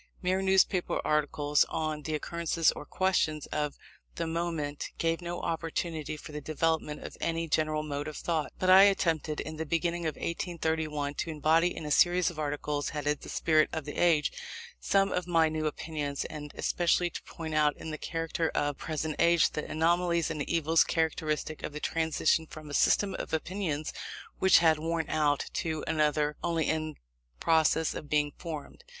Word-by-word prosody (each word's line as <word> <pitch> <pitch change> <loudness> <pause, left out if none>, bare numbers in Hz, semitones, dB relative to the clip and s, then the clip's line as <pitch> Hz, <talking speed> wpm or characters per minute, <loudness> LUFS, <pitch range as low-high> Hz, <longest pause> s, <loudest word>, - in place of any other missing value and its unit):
Mere 185 +1 +1
newspaper 190 -1 +2
articles 150 -1 +2
on 155 -2 -2
the 155 +1 -3
occurrences 165 +1 +1
or 150 - -9
questions 160 -5 +1
of 150 -1 -2 0.4
the 170 - -2
moment, 160 -3 -3
gave 165 +1 0
no 175 0 -4
opportunity 160 -1 -3
for 155 - -10
the 150 0 -5
development 155 0 -1
of - - -8
any 165 0 -1
general 155 -1 +1
mode 145 -1 -4
of 155 - -6
thought; 160 -3 -1
but 185 - -1
I 185 +1 +9
attempted, 165 -6 +1
in 155 0 -5
the 160 - -2
beginning 170 +1 0
of 155 - -2
1831, 160 -4 -2
to 165 - -3
embody 160 +3 +2
in 155 - -5
a 150 - -4
series 180 +3 +4
of 160 - -10
articles, 145 0 -2
headed 150 0 -2
"The - - -9
Spirit 155 -1 +3
of 160 -3 -4
the 145 - -6
Age," 160 -4 +3 0.5
some 195 - +2
of 180 -1 -1
my 165 -2 +4
new 155 0 -1
opinions, 150 -2 -3
and 150 -1 -7
especially 175 0 +1
to - - -6
point 160 -1 -7
out 150 -1 +3
in 160 - -6
the 155 - -5
character 165 0 -2
of 145 -1 0
the - - -17
present 155 -1 -2
age, 170 0 +4
the 150 - -4
anomalies 170 +1 +1
and 150 -2 -3
evils 165 0 +4
characteristic 155 -1 -1
of - - -5
the 150 - -5
transition 160 0 +1
from 155 -1 -10
a - - -7
system 195 +6 +3
of - - -6
opinions 160 -2 -2 0.5
which 190 - +6
had 160 -1 +5
worn 165 0 -1
out, 150 -2 +2
to 160 -2 -2
another 150 -1 +1
only 165 -2 0
in 155 -1 -1 0.4
process 160 0 +3
of 150 - -7
being 150 0 +2
formed. 165 - -7
160 Hz, 180 wpm, -29 LUFS, 150-170 Hz, 0.5 s, I